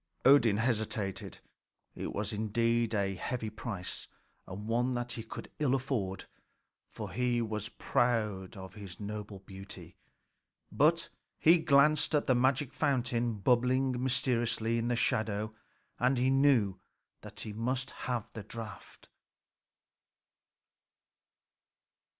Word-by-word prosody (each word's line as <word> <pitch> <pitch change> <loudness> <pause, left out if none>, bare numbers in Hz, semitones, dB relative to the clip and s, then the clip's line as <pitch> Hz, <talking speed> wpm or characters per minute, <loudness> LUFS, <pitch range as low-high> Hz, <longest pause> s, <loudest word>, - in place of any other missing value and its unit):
Odin 125 -6 +6
hesitated. 110 -4 -2 0.5
It - - -5
was 105 +2 -3
indeed 115 +2 +1
a 100 -1 +1
heavy 110 +4 -3
price, 105 -4 -5 0.4
and 100 +3 -7
one 120 +2 +1
that 120 0 -3
he 115 - -4
could 110 - -9
ill 140 -3 +3
afford, 120 -8 -2 0.6
for - - -7
he 125 0 +1
was 110 -1 -3
proud 110 -5 0
of 95 -1 -9
his 100 -4 -9
noble 105 -1 -6
beauty. 95 0 -11 0.8
But - - +3 0.3
he 165 +2 +6
glanced 150 0 +4
at 150 - +2
the 130 - +4
magic 130 +2 +2
fountain 120 -5 0
bubbling 125 +4 +2
mysteriously 115 -3 +1
in 115 - -1
the 120 - +1
shadow, 110 -1 0 0.5
and 125 +2 +3
he 130 +2 +3
knew 130 -9 +3 0.4
that - - -9
he 105 - -6
must 125 +4 -1
have 120 -4 -3
the 110 - -7
draught. 105 -1 -9
115 Hz, 120 wpm, -32 LUFS, 105-125 Hz, 0.8 s, Odin